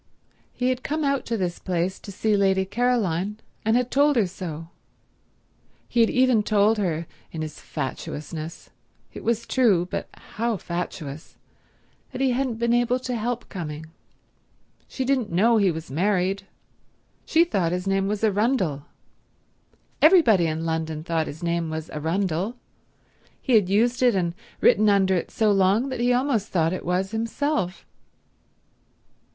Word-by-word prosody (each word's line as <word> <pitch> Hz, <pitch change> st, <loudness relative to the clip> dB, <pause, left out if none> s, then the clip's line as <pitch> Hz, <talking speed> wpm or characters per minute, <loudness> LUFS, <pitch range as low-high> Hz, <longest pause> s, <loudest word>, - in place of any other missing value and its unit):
He 250 Hz, 0 st, -1 dB
had 255 Hz, 0 st, -1 dB
come 305 Hz, +3 st, -2 dB
out 275 Hz, -1 st, 0 dB
to 230 Hz, -, -1 dB
this 180 Hz, -3 st, -2 dB
place 180 Hz, +1 st, -2 dB
to 200 Hz, -, -9 dB
see 210 Hz, +2 st, +1 dB
Lady 190 Hz, -1 st, +2 dB
Caroline, 210 Hz, -4 st, 0 dB, 0.3 s
and 220 Hz, +2 st, +3 dB
had 250 Hz, 0 st, -1 dB
told 290 Hz, +1 st, +4 dB
her 225 Hz, -5 st, +3 dB
so. 165 Hz, -3 st, -7 dB, 1.2 s
He 240 Hz, -, -1 dB
had 230 Hz, -, +5 dB
even 255 Hz, -3 st, +3 dB
told 210 Hz, +1 st, +2 dB
her 170 Hz, -4 st, -1 dB, 0.3 s
in 160 Hz, -1 st, -4 dB
his 155 Hz, -1 st, -7 dB
fatuousness—it 155 Hz, +2 st, -7 dB
was 230 Hz, 0 st, 0 dB
true, 205 Hz, -11 st, +3 dB
but -, -, -4 dB, 0.3 s
how 230 Hz, -1 st, 0 dB
fatuous—that 165 Hz, -, -9 dB
he 265 Hz, -1 st, +2 dB
hadn't 250 Hz, -2 st, -1 dB
been 235 Hz, +1 st, +1 dB
able 240 Hz, +1 st, +2 dB
to 250 Hz, -1 st, -3 dB
help 240 Hz, +1 st, -3 dB
coming. 160 Hz, -3 st, -7 dB, 1.0 s
She 260 Hz, -, -4 dB
didn't 255 Hz, -6 st, 0 dB
know 225 Hz, +7 st, +4 dB
he 200 Hz, -3 st, +3 dB
was 160 Hz, -3 st, -5 dB
married. 190 Hz, +4 st, 0 dB, 0.8 s
She 330 Hz, -, +4 dB
thought 190 Hz, -, 0 dB
his 180 Hz, +1 st, -2 dB
name 195 Hz, 0 st, +1 dB
was 210 Hz, +1 st, -2 dB
Arundel. 205 Hz, -, +1 dB, 1.1 s
Everybody 290 Hz, -, +6 dB
in 160 Hz, +1 st, -3 dB
London 160 Hz, -1 st, -2 dB
thought 165 Hz, -2 st, -1 dB
his 155 Hz, +4 st, -8 dB
name 170 Hz, -1 st, -1 dB
was 160 Hz, 0 st, -5 dB
Arundel. 180 Hz, +6 st, -1 dB, 0.8 s
He 260 Hz, -, -1 dB
had 205 Hz, -5 st, +4 dB
used 235 Hz, +5 st, +2 dB
it 245 Hz, -4 st, +4 dB
and 175 Hz, -3 st, 0 dB, 0.3 s
written 215 Hz, +1 st, +5 dB
under 195 Hz, -2 st, +3 dB
it 175 Hz, -, -1 dB
so 215 Hz, -2 st, +2 dB
long 200 Hz, +6 st, +3 dB
that 260 Hz, -, -4 dB
he 245 Hz, +1 st, +2 dB
almost 245 Hz, -4 st, +1 dB
thought 165 Hz, -1 st, +1 dB
it 185 Hz, -, -5 dB
was 185 Hz, +2 st, 0 dB
himself. 225 Hz, -3 st, -2 dB
200 Hz, 150 wpm, -24 LUFS, 170-235 Hz, 1.2 s, Everybody